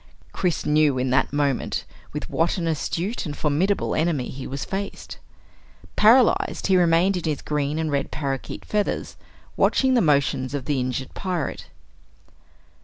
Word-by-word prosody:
Chris 180 -4 -1
knew 150 -2 +3
in 125 0 0
that 130 - +2
moment 145 -2 -1 0.3
with - - -5
what 165 +3 0
an 175 - -2
astute 170 +6 -2
and 145 - -6
formidable 165 +7 +1
enemy 155 -6 0
he 135 0 -7
was 140 +1 -4
faced. 195 +1 -5 0.8
Paralyzed, 235 +3 +4
he 190 - +3
remained 180 +2 +3
in 175 - -4
his 150 -3 -2
green 150 0 -1
and 160 -1 -1
red 140 -1 -1
parakeet 135 -3 -4
feathers 210 -1 -2 0.4
watching 265 -1 +3
the 245 - +4
motions 140 -3 +1
of 135 -3 -4
the 145 -2 0
injured 130 +1 -3
pirate. 180 -5 -3
155 Hz, 150 wpm, -24 LUFS, 140-180 Hz, 0.8 s, Paralyzed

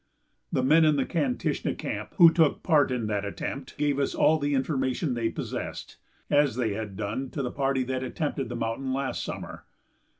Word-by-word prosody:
The 130 - +1
men 155 +5 +5
in 155 -1 +4
the 135 - +1
Kantishna 250 +9 -1
camp - - -5
who 170 -4 +8
took 160 -3 +2
part 155 -5 +4
in 125 -3 -1
that 105 -1 -1
attempt 130 +6 -5
gave 145 -1 +1
us 140 - 0
all 155 +1 +4
the 145 0 0
information 130 +1 0
they 115 -2 0
possessed, - - -6 0.3
as 145 -5 +3
they 115 -4 0
had 105 -2 -5
done 110 +6 -3
to 140 - -4
the 125 - -2
party 135 -1 0
that 130 0 -2
attempted 135 -1 -3
the 120 - -4
mountain 120 +3 -2
last 135 0 -2
summer. - - -7
135 Hz, 190 wpm, -27 LUFS, 120-145 Hz, 0.3 s, who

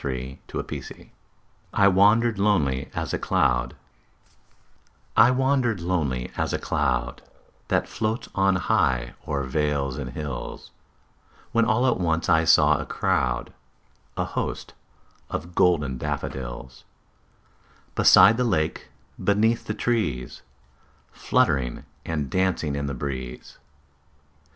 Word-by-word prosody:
William 65 -1 -4
Wordsworth - - -7 0.7
I 100 - +5
Wandered 105 +3 +4
Lonely 75 -11 +1
As - - -3
a - - -1
Cloud 60 0 +1 1.4
I 120 - +7
WANDERED 130 -4 +1
lonely 75 -8 -2
as - - -2
a - - +1
cloud 70 -4 -1 0.5
That - - +1
floats 110 +1 -3
on 95 -1 +2
high 75 - +1
o'er 70 -3 -1
vales 70 0 -1
and 65 -3 -5
hills, 70 -1 -6 0.8
When 115 0 +3
all 115 +3 +2
at 125 - +2
once 85 -2 0
I 80 0 +4
saw 75 -2 +5
a 75 - -4
crowd, 60 0 -1 0.6
A - - 0
host, - - -4 0.6
of 85 +3 -5
golden 75 -8 +2
daffodils; 65 -3 -5 1.1
Beside 115 - +7
the 125 - +1
lake, 80 -10 -1 0.4
beneath 110 +3 +2
the 105 - -2
trees, 75 - -2 0.7
Fluttering 65 0 0 0.2
and 75 -4 -3
dancing 95 -6 0
in 70 0 -3
the 70 - -4
breeze. 65 -1 -6
75 Hz, 115 wpm, -24 LUFS, 65-100 Hz, 1.4 s, I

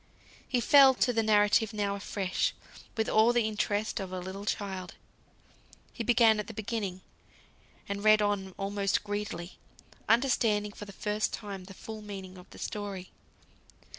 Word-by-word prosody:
He 250 - +1
fell 270 +1 +7
to 250 0 +2
the 225 - +2
narrative 210 0 +3
now 205 -1 -1
afresh, 200 -1 -1 0.4
with 220 - +1
all 220 +2 +5
the 240 -2 +2
interest 210 0 -1
of 190 -2 -5
a 185 - -4
little 190 +2 -6
child. 190 -4 -3 1.0
He 235 - -4
began 230 -2 +5
at 210 - -4
the 225 - -9
beginning, 205 -4 -3 0.9
and 200 0 -4
read 215 0 +6
on 205 -3 -1
almost 200 0 0
greedily, 205 -4 -5 0.5
understanding 225 -4 +2
for 205 - -9
the 200 - -10
first 210 +2 -2
time 200 -4 -6
the 195 0 -11
full 220 +2 -8
meaning 190 -3 -8
of 180 - -15
the - - -13
story. 200 -3 -5
205 Hz, 155 wpm, -30 LUFS, 195-220 Hz, 1.0 s, fell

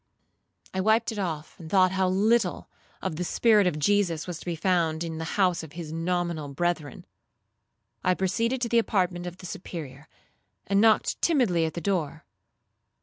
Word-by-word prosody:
I 190 - 0
wiped 220 +4 +2
it 215 - -5
off, 160 -5 -4
and 160 -2 -9
thought 185 -1 +4
how 190 0 +1
little 215 +5 +1 0.4
of 155 - -3
the 180 - -1
spirit 210 +1 +3
of 155 - 0
Jesus 175 -1 +1
was 175 -3 -6
to - - -12
be 170 - -1
found 165 -2 +1
in 160 -1 -5
the - - -3
house 185 -3 +3
of 160 -3 -11
his 165 -3 -7
nominal 170 -2 -1
brethren. 155 0 -2 1.0
I 185 - +3
proceeded 230 +7 0
to 240 - +1
the 235 0 +4
apartment 180 -5 0
of 175 0 -7
the 185 - -11
Superior, 155 -5 -8 0.6
and 200 +1 +2
knocked 220 -1 +3
timidly 230 - +2
at 160 - -4
the 170 - -4
door. 160 -5 -2
180 Hz, 175 wpm, -27 LUFS, 160-200 Hz, 1.0 s, thought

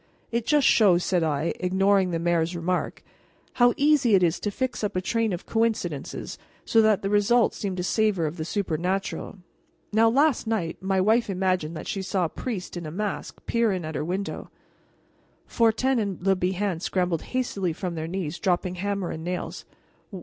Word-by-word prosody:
"It 235 -1 -1
just 295 -2 +3
shows," 185 -6 +5
said 180 -2 +1
I, 155 0 0
ignoring 190 +1 +2
the 170 - -1
mayor's 170 0 0
remark, 175 +2 -2 0.6
"how 245 0 +6
easy 280 -6 +4
it 185 - +4
is 170 -1 +2
to 210 - -2
fix 245 +2 -3
up 210 -1 -2
a - - +2
train 225 +3 0
of 175 0 -4
coincidences 220 -10 -2 0.3
so 225 - +4
that 215 -3 +3
the 195 - 0
result 215 +3 +3
seems 195 -3 -4
to 180 - -2
savor 205 -3 +1
of 155 +3 -4
the 160 - -3
supernatural. 185 +2 -2 0.6
Now, 225 +1 +5
last 275 0 +2
night 185 -8 -2
my 190 0 +1
wife 220 +4 +3
imagined 185 -4 -1
that - - -7
she 195 - -2
saw 190 -1 0
a - - -2
priest 200 -5 -5
in 170 -2 -5
a - - -6
mask 205 +3 -5
peer 230 -2 +2
in 185 -4 -3
at 155 - -5
her - - -2
window 185 +5 -4 0.5
" - - -38
Fortin 235 +3 +3
and 200 -4 -2
Le 195 0 +4
Bihan 185 0 -1
scrambled 180 -4 0
hastily 205 -8 -2
from 175 +2 -4
their 160 -1 -4
knees, 175 -2 -4
dropping 180 0 0
hammer 200 -1 -2
and 160 - -6
nails. 180 +1 -4
190 Hz, 185 wpm, -25 LUFS, 175-220 Hz, 0.6 s, how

